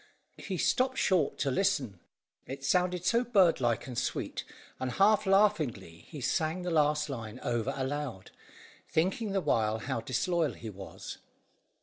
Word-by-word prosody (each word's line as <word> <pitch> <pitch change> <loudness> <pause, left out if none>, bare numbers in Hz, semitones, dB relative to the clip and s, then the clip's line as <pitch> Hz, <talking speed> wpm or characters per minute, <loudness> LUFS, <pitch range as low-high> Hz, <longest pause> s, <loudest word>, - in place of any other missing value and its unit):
He 190 - -4
stopped 260 +8 +1
short 175 -6 +2
to 140 - 0
listen, 130 - 0 0.5
it 135 +1 -7
sounded 180 +2 +1
so 235 +6 +3
bird 195 - +4
like 120 -2 +1
and 125 - -7
sweet, 120 - -2 0.4
and 130 -1 -2
half 200 0 +4
laughingly 155 - +1
he 145 - -8
sang 160 +6 0
the 180 - -2
last 150 -1 +2
line 115 -6 -6
over 120 -2 0
aloud, 130 -6 -4 0.6
thinking 190 +6 0
the 195 -1 +1
while 110 -7 +1
how 115 0 -3
disloyal 155 +5 0
he 110 -2 -8
was. 95 -1 -9
150 Hz, 145 wpm, -30 LUFS, 120-185 Hz, 0.6 s, bird